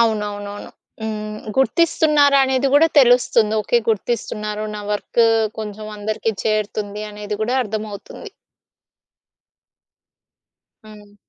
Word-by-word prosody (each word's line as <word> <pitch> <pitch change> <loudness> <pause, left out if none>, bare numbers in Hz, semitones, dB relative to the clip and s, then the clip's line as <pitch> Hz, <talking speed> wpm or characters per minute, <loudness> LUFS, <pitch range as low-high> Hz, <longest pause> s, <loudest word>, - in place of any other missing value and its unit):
అవునవునవును. 205 -2 -2 0.3
హ్మ్. 215 -1 -4 0.2
గుర్తిస్తున్నారనేది 280 -3 +3
గూడా 325 +3 +6
తెలుస్తుంది. 240 -4 +3
ఓకే 240 - +2
గుర్తిస్తున్నారు, 215 -1 -3
నా 210 - -5
వర్కు 230 +2 +1 0.3
కొంచెం 215 0 -7
అందరికి 215 +2 -2
చేరుతుంది 210 -1 -2
అనేది 210 0 -5
గూడా 245 +4 0
అర్థమవుతుంది. 215 - -7 2.5
హ్మ్. 210 -1 -15
215 Hz, 85 wpm, -20 LUFS, 210-245 Hz, 2.5 s, గూడా